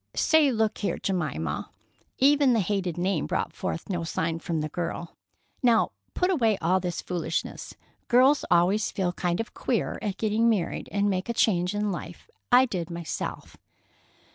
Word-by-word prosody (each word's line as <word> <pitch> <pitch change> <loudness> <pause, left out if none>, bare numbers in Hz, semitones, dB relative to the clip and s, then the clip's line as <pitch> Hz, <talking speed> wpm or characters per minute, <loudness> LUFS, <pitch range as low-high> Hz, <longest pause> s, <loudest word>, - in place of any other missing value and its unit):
"Say, 315 -3 +4
look 220 -2 0
here, 205 - -1
Jemima"—even 195 - 0
the 230 - +3
hated 190 -3 -1
name 185 +3 0
brought - - -2
forth - - -4
no 175 -5 -2
sign 165 0 -2
from 165 -1 -2
the 155 - -3
girl—"now 175 - -2 0.2
put 360 +1 +2
away 225 - +2
all 185 +2 +2
this 175 -2 -4
foolishness. 170 -2 -3 0.3
Girls 260 +4 +5
always 180 +5 +3
feel 180 -2 -1
kind 175 -1 -1
of 225 - -4
queer - - -1
at 205 -3 -3
getting 220 +1 +2
married 200 -7 -1
and 200 0 +1
making 190 +3 -1
a - - -17
change 180 -2 +2
in 205 0 0
life. 175 - -7 0.2
I 250 +1 +7
did, 180 -8 -4
myself." 170 -1 -5
195 Hz, 155 wpm, -26 LUFS, 175-230 Hz, 0.3 s, I